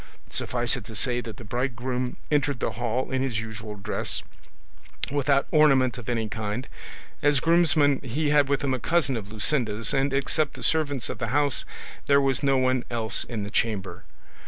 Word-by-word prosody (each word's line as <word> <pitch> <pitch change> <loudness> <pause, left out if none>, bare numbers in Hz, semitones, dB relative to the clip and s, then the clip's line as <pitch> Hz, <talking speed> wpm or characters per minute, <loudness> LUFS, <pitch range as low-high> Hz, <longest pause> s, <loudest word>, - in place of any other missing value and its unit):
Suffice 120 +3 +1
it 125 - -6
to 110 - -9
say 125 +3 0
that 115 -3 -8
the - - -10
bridegroom 125 +2 -3
entered 145 -3 +1
the - - -1
hall 120 +2 -2
in 130 0 0
his 130 -5 -1
usual 110 -1 -7
dress, 100 - -1 0.9
without 140 -1 +2
ornament 135 -5 +4
of 120 - -7
any 115 -2 -1
kind; 110 +3 -4 0.5
as 145 -1 +3
groomsman 155 -3 +3
he 145 +4 -1
had 145 -2 +4
with 140 0 0
him 135 -2 +1
a 130 - -1
cousin 140 +2 +1
of 105 -3 -6
Luscinda's 110 0 +1
and 135 0 +1
except 140 +2 +1
the - - -6
servants 145 -5 +2
of 115 - -6
the 115 - -2
house 145 +3 +1 0.4
there 140 0 +5
was 135 -1 +2
no 135 -2 +3
one 130 -1 +1
else 115 -2 +1
in 110 -4 -4
the 100 - -6
chamber. 95 -6 -2
130 Hz, 180 wpm, -25 LUFS, 115-140 Hz, 0.9 s, there